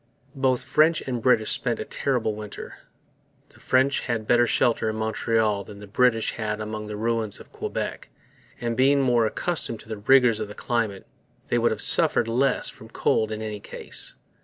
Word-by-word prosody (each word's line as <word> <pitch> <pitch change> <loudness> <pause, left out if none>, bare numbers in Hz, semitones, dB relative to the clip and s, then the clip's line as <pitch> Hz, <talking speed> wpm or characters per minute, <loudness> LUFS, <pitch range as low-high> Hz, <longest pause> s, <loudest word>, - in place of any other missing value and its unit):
Both 130 -2 +1
French 155 +1 +3
and 125 -3 -4
British 110 -3 +3
spent - - 0
a - - -4
terrible 125 -6 -1
winter. 105 -1 -8 0.8
The - - -21
French 135 +2 +2
had 115 -3 -3
better 120 +1 +3
shelter 115 -2 +2
in 110 - -3
Montreal 110 -1 0
than 100 - -12
the 105 - -10
British 115 +2 +2
had 105 -1 -3
among 105 0 -5
the 105 - -5
ruins 115 -1 -1
of - - -15
Quebec; - - -5 0.5
and, 120 -1 -2
being 140 +3 +4
more 120 -3 +3
accustomed 135 -4 -1
to - - -16
the 110 - -4
rigours 120 +1 +4
of 110 - -3
the 105 - -10
climate, 115 -5 -2 0.4
they 120 - +2
would 120 - +3
have 110 - -2
suffered - - +4
less 125 +3 +1
from - - -7
cold 110 0 0
in 110 0 -4
any 105 -1 -5
case. - - -5
115 Hz, 185 wpm, -24 LUFS, 110-125 Hz, 0.8 s, being